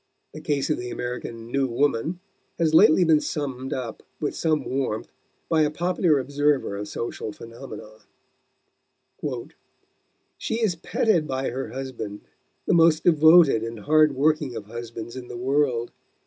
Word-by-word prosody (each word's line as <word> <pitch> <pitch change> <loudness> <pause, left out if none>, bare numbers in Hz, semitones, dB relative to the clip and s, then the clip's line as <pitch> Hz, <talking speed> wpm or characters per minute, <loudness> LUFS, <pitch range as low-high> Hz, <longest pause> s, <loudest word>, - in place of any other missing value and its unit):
The 155 - -8
case 145 -1 -1
of - - 0
the 125 0 -5
American 120 -2 -6
"new 135 0 +1
woman" 140 +6 0 0.4
has 160 -2 +1
lately 160 +2 +6
been 160 -3 +5
summed 135 -3 -4
up 120 -4 -4 0.2
with 150 - -2
some 155 -4 0
warmth 130 -5 -2 0.4
by 160 -1 +2
a 150 - +3
popular 170 0 +1
observer 140 -3 0
of 105 +1 -5
social 115 -1 -5
phenomena: 115 - -10 2.5
"She 225 - -2
is 220 -6 +2
petted 170 -1 +1
by 130 -2 -2
her 130 +2 -4
husband, 125 -6 -6 0.4
the - - +2
most 165 -2 +4
devoted 160 -6 +6
and 115 -1 -6
hard 155 +2 +4
working 150 -2 +1
of 110 -2 -6
husbands 115 +1 -8
in 130 -1 -8
the 120 - -7
world.... 130 -2 0
135 Hz, 145 wpm, -24 LUFS, 120-155 Hz, 2.5 s, lately